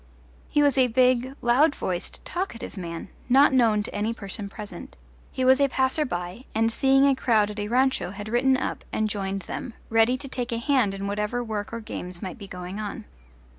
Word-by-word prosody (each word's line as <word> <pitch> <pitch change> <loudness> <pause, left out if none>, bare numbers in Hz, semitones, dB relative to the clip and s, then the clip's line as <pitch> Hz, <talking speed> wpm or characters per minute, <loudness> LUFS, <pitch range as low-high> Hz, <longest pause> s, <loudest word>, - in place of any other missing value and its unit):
He 295 - +3
was 280 -2 +3
a 255 - +5
big, 255 +2 +2
loud 270 +6 +4
voiced, 180 -1 -4
talkative 350 - -4
man, 170 -1 -6 0.2
not 270 +3 +6
known 225 -5 +4
to - - -5
any 215 +3 -1
person 200 0 -4
present; 210 0 -9 0.3
he 260 - -1
was 260 +2 +5
a 280 - +4
passer 265 +4 +1
by, 180 +2 -5
and 225 +1 +2
seeing 270 +3 +4
a 280 - +5
crowd 215 -5 +2
at 210 - -7
a 205 - -2
rancho 260 -1 +1
had 205 +2 -7
ridden 260 +4 +3
up - - -3
and 215 - 0
joined 195 -2 -3
them, 235 +6 -6 0.2
ready 225 +3 +4
to 275 - -7
take 250 -2 -4
a 230 - 0
hand 235 -5 +2
in 195 0 -5
whatever 210 +4 -1
work 215 -3 -4
or 230 0 -5
games 180 -4 -6
might 185 +4 -6
be 200 - -8
going 180 +2 -7
on. 210 0 -5
230 Hz, 205 wpm, -25 LUFS, 205-260 Hz, 0.3 s, not